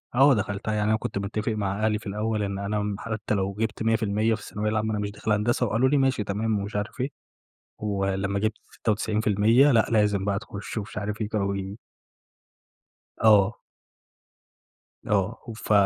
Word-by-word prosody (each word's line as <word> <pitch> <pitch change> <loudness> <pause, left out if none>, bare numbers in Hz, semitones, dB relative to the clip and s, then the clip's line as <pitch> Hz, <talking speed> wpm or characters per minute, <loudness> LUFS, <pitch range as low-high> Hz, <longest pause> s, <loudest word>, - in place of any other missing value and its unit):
آه، 135 +2 +7
دخلتها 105 -1 -2
يعني 105 0 +1
أنا 110 - +3
كنت 100 - -4
متّفق 105 +3 -2
مع 105 0 -1
أهلي 105 -1 +1
في 110 - -11
الأول 105 +1 -1
إن 100 -1 -3
أنا 105 +1 -1
م 105 -1 -2
حتى 110 -1 -3
لو 100 -1 0
جِبت 110 +2 -2
100% 110 -1 +2
في 105 - -10
الثانوية 105 +1 -3
العامة 110 0 0
أنا 105 - -1
مش 105 0 -2
داخل 105 +1 -3
هندسة، 115 +4 +2
وقالوا 120 +4 +2
لي: 145 - +3
"ماشي، 130 -5 +2
تمام." 105 +1 -1
ومش 100 +1 -5
عارف 105 +5 -3
إيه، 135 - 0 0.7
ولمّا 95 -1 -1
جِبت 110 +1 -1
96% 110 +4 +3
لأ، 115 -3 +4
لازم 105 -3 +2
بقى 100 -1 0
تُخش 100 +2 -7
ومش 100 - -5
عارف 105 +2 -3
إيه، 105 - -1
كانوا 100 -2 0
بي 100 +2 -5 1.4
آه. 105 -1 +5 1.5
آه، - - 0
وف 110 -1 -6
105 Hz, 175 wpm, -26 LUFS, 100-110 Hz, 1.5 s, آه